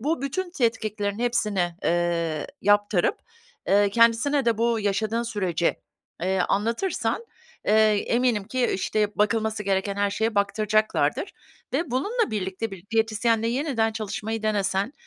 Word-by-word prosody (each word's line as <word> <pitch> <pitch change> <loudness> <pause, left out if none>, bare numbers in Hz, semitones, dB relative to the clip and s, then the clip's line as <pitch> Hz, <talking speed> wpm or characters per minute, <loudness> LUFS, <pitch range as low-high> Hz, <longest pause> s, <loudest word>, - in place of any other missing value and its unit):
bu 295 +3 -1
bütün 350 +7 -3
tetkiklerin 215 - -1
hepsini, 210 -8 0
eee, 170 -3 0 0.2
yaptırıp, 205 -2 +3 0.5
eee, 200 0 +4
kendisine 235 +6 +3
de 230 -2 +1
bu 230 -1 +1
yaşadığın 215 +3 0
süreci, 185 -7 -1 0.5
eee, 190 +1 +1
anlatırsan, 230 - -1 0.4
eee, 210 - +4 0.3
eminim 235 -4 +1
ki 255 +4 0
işte 205 +2 -1
bakılması 220 0 +1
gereken 195 0 0
her 200 0 +1
şeye 220 +2 -1
baktıracaklardır 215 +1 +1 0.4
ve 290 0 -1
bununla 410 - 0
birlikte 195 +1 -3
bir 190 -1 -10
diyetisyenle 225 0 +1
yeniden 240 -4 0
çalışmayı 220 +1 -4
denesen 205 +2 0
215 Hz, 125 wpm, -25 LUFS, 200-235 Hz, 0.5 s, eee